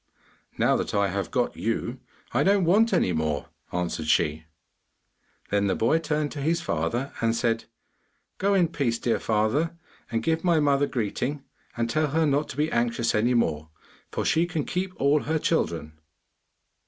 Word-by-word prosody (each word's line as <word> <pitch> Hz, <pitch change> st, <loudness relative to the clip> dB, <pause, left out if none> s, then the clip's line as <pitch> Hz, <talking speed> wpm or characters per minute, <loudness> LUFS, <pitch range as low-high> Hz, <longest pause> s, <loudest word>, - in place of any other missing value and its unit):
'Now -, -, +3 dB
that -, -, -3 dB
I 100 Hz, -1 st, +2 dB
have 100 Hz, +1 st, -2 dB
got 125 Hz, -2 st, 0 dB
you, 115 Hz, +2 st, -2 dB, 0.3 s
I 125 Hz, -, +1 dB
don't 195 Hz, +2 st, +3 dB
want 215 Hz, +7 st, +4 dB
any 90 Hz, -, +2 dB
more,' 80 Hz, -2 st, -1 dB, 0.2 s
answered 85 Hz, -3 st, -2 dB
she. 80 Hz, 0 st, +1 dB, 1.1 s
Then 100 Hz, 0 st, +2 dB
the 95 Hz, -, +1 dB
boy 140 Hz, +8 st, +2 dB
turned 150 Hz, -2 st, -1 dB
to 145 Hz, -, -5 dB
his 165 Hz, +4 st, +1 dB
father 120 Hz, -, -2 dB
and 115 Hz, 0 st, +2 dB
said, 115 Hz, -1 st, 0 dB, 0.7 s
'Go 200 Hz, +1 st, +2 dB
in 175 Hz, -4 st, +3 dB
peace, 130 Hz, -8 st, 0 dB
dear 115 Hz, 0 st, 0 dB
father, 120 Hz, +11 st, 0 dB, 0.3 s
and 115 Hz, -1 st, -1 dB
give 160 Hz, 0 st, 0 dB
my 170 Hz, -3 st, +3 dB
mother 145 Hz, -1 st, +3 dB
greeting 130 Hz, +4 st, -2 dB, 0.3 s
and 115 Hz, 0 st, 0 dB
tell 155 Hz, +6 st, +1 dB
her 160 Hz, +3 st, +1 dB
not 145 Hz, +1 st, +1 dB
to -, -, -8 dB
be 150 Hz, +2 st, +1 dB
anxious 115 Hz, 0 st, +1 dB
any 120 Hz, +4 st, +2 dB
more, 80 Hz, -9 st, 0 dB, 0.4 s
for -, -, -2 dB
she 165 Hz, +2 st, +2 dB
can 160 Hz, -4 st, -2 dB
keep 185 Hz, +1 st, -2 dB
all 140 Hz, +2 st, +3 dB
her 160 Hz, +2 st, 0 dB
children. 85 Hz, -, -1 dB
130 Hz, 170 wpm, -26 LUFS, 105-160 Hz, 1.1 s, want